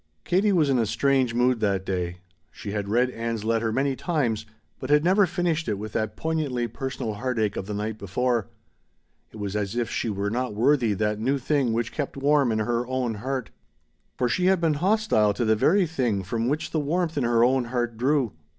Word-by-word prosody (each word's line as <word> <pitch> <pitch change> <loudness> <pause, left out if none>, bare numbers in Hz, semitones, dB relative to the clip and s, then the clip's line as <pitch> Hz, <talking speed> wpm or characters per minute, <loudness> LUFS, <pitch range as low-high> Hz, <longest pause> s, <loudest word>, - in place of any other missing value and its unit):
Katie 195 +4 +2
was 165 -6 +3
in 135 -3 +2
a 115 - +1
strange 130 -1 +1
mood 125 0 +2
that 100 -3 0
day. 90 -2 -3 0.3
She 100 +4 -8
had 100 -1 -3
read 125 +4 +2
Ann's 115 -2 -3
letter 115 0 0
many 135 +3 0
times, 120 - -1 0.3
but 130 - -6
had 150 0 +4
never 190 +3 +4
finished 170 -2 -1
it 105 -3 -1
with 105 +1 -7
that 110 -1 -2
poignantly 150 -7 -1
personal 130 -2 -4
heartache 110 -2 -1
of 95 - -4
the 105 - -4
night 110 +1 -3
before. 115 +3 0 0.8
It - - -11
was 100 -1 -4
as 105 0 -2
if 120 -2 -1
she 115 - -1
were 100 0 -2
not 125 -2 -2
worthy 120 -1 +3
that 105 +1 -1
new 130 +5 +1
thing 135 -2 +1
which 115 +1 -1
kept 145 -2 -4
warm 140 -2 +3
in 110 - 0
her 120 +2 -1
own 130 -2 -1
heart. 125 +2 -4 0.7
For 125 - +1
she 180 +9 +1
had 190 -1 +4
been 165 -2 +2
hostile 190 - +2
to 120 - 0
the 110 0 +3
very 180 - +3
thing 125 - -1
from 115 +5 -2
which 150 +4 -1
the 160 - 0
warmth 165 +3 -1
in 140 - 0
her 115 -1 +3
own 130 0 +3
heart 120 -1 -2
drew. 130 0 +1
120 Hz, 210 wpm, -25 LUFS, 110-140 Hz, 0.8 s, had